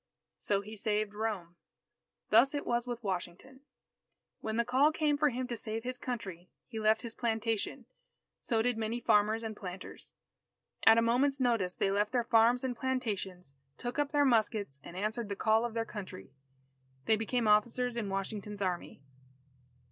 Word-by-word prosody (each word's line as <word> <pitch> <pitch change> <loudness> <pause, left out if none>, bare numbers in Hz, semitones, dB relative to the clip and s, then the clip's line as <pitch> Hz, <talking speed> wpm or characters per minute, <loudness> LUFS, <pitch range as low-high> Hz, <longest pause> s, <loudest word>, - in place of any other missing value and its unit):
So 200 -1 0
he 215 +2 -9
saved 210 0 -1
Rome. 205 -6 -3 0.7
Thus 245 +7 +6
it 290 - -3
was 240 0 0
with 240 -1 -5
Washington. 190 +7 -5 0.8
When 220 0 -3
the 235 - +2
call 265 +5 +4
came 305 -2 +1
for 295 +1 +3
him 255 0 -3
to 240 - -2
save 225 0 -4
his 255 0 -4
Country, 190 -9 -5 0.2
he 225 -3 -6
left 220 +1 +3
his 230 -2 -5
plantation. 225 -2 -2 0.5
So 225 -2 0
did 245 -2 0
many 225 +2 -2
farmers 220 0 +3
and 220 -1 -4
planters; 185 -2 -9 0.7
at 225 0 +9
a 230 - +4
moment's 270 +4 +2
notice 230 -8 +1
they 195 - +1
left 205 +3 0
their 245 -2 +2
farms 235 +2 +4
and 255 -2 -1
plantations, 205 - -3 0.2
took 245 +3 -4
up 290 -1 0
their 290 -1 +3
muskets 215 - +1
and 175 - -9
answered 215 +2 -2
the 200 - -2
call 220 +3 +3
of 235 -1 -5
their 225 0 0
Country. 190 - -8 0.7
They 220 - +4
became 225 +1 -1
officers 235 +3 +3
in 220 -4 -2
Washington's 200 +1 -4
Army. 175 -6 -3
225 Hz, 170 wpm, -32 LUFS, 205-245 Hz, 0.8 s, at